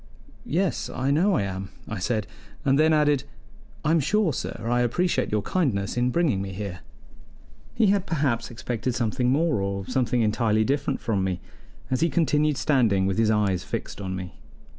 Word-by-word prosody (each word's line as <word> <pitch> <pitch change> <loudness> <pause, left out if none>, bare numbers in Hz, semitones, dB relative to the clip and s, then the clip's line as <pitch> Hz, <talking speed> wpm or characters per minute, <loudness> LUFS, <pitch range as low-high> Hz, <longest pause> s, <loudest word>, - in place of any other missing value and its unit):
"Yes, 185 +3 0
I 130 +2 -1
know 180 +7 +3
I 100 - +1
am," 95 0 -4 0.2
I 110 - -4
said, 110 +2 -1 0.4
and 135 +1 +3
then 160 +1 +5
added: 150 -3 +3 0.6
"I'm 160 +2 +4
sure, 195 +2 +2
sir, - - -4
I 120 +1 +2
appreciate 170 +10 +1
your 105 -1 0
kindness 110 - 0
in 120 +1 +2
bringing 135 - +1
me 95 0 -5
here." 95 -2 -5 1.0
He 225 - +3
had 200 -2 -1
perhaps 140 -7 0
expected 120 0 -3
something 125 +1 0
more 150 -4 +2
or 100 0 -2
something 125 -1 +1
entirely 110 0 +2
different 140 +2 -1
from 100 -5 0
me, 95 -1 -1 0.5
as 130 - +1
he 165 - +3
continued 150 -1 +2
standing 115 -12 +2
with 95 +3 0
his 110 -1 +3
eyes 100 -4 +1
fixed - - -5
on 95 -1 -3
me. 90 -4 -7
125 Hz, 175 wpm, -25 LUFS, 100-150 Hz, 1.0 s, then